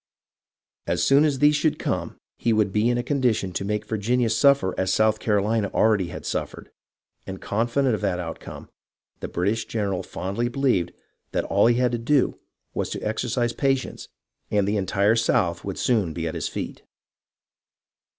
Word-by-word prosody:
As - - 0
soon 140 +2 +5
as 145 -3 +1
these 150 +2 +4
should 150 +1 +1
come - - -3 0.2
he 115 - +2
would 105 -2 +2
be 110 +3 +2
in 120 - +1
a 120 - -1
condition 120 -9 0
to 95 - -2
make 105 +1 -2
Virginia 115 +2 0
suffer 125 -4 +3
as 95 - 0
South 110 0 +2
Carolina 105 0 +1
already 105 -5 +3
had - - -8
suffered, - - -4 0.6
and, 95 -1 -6
confident 120 +5 0
of 105 - -2
the 90 - 0
outcome, 80 -2 -8 0.5
the - - -5
British 105 +6 -1
general 100 -5 -2
fondly 100 +6 -3
believed 120 -10 +1 0.4
that - - 0
all 100 +3 +3
he 120 - +4
had 125 0 +2
to 120 - -2
do 135 +3 +1 0.3
was - - -2
to - - -5
exercise 120 -1 -1
patience, 135 0 -1 0.4
and 100 -2 +1
the 105 - +1
entire 100 +2 +2
South 115 0 +1
would - - -5
soon 105 -10 +1
be 85 0 -3
at 80 - -4
his - - -3
feet. - - -6
110 Hz, 170 wpm, -24 LUFS, 100-125 Hz, 0.6 s, soon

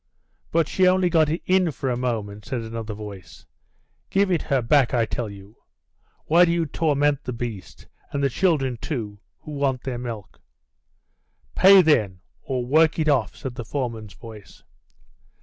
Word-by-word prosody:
"But 165 -2 +2
she 185 -1 +2
only 185 -1 +3
got 160 -2 +3
in 180 +2 +1
for 135 -2 -5
a - - 0
moment," 105 -4 -3
said 130 -2 -3
another 110 -1 -6
voice. 100 -3 -10 0.6
"Give 195 0 +2
it 170 - +1
her 135 - 0
back, 130 +2 +3
I 115 -2 +2
tell 115 0 -4
you. 100 +1 -13 0.7
Why 170 +3 +5
do 170 - +3
you 170 -1 +1
torment 145 -1 0
the - - -4
beast, 115 -5 -7 0.3
and 140 0 -2
the - - +4
children, 135 -8 +1
too, 110 -7 -5 0.2
who 155 - -10
want 140 -3 -1
their 125 -3 -4
milk?" 110 -7 -8 1.1
"Pay, 190 0 +7
then, 105 - +2 0.2
or 130 -5 -3
work 155 +4 +3
it 155 -2 +1
off," 130 -6 +1
said 130 -3 -6
the 120 - -6
foreman's 115 -4 -5
voice. 110 -3 -13
130 Hz, 165 wpm, -23 LUFS, 115-155 Hz, 1.1 s, Pay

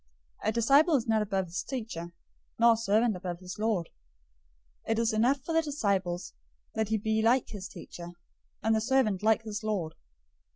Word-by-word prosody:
010:024 - - +3
"A - - +2
disciple 280 +8 +4
is 250 -3 0
not 220 -1 +3
above 195 -2 -1
his 175 +1 -4
teacher, 215 -10 -5 0.5
nor 235 0 +6
a - - -2
servant 220 0 +2
above 180 -1 -5
his 185 +2 -8
lord. 210 -6 0 1.0
010:025 - - 0
It 225 - -1
is 230 -1 +1
enough 250 +5 +2
for 330 - -2
the 325 - +4
disciple 200 - -1 0.5
that 220 -2 -1
he 220 - +2
be 220 +1 0
like 235 +3 +3
his 195 -3 -6
teacher, 175 -3 -9 0.5
and 225 - +3
the 220 - +1
servant 225 -5 +2
like 220 +1 +3
his 215 0 -5
lord. 200 -7 -2
220 Hz, 190 wpm, -29 LUFS, 195-235 Hz, 1.0 s, nor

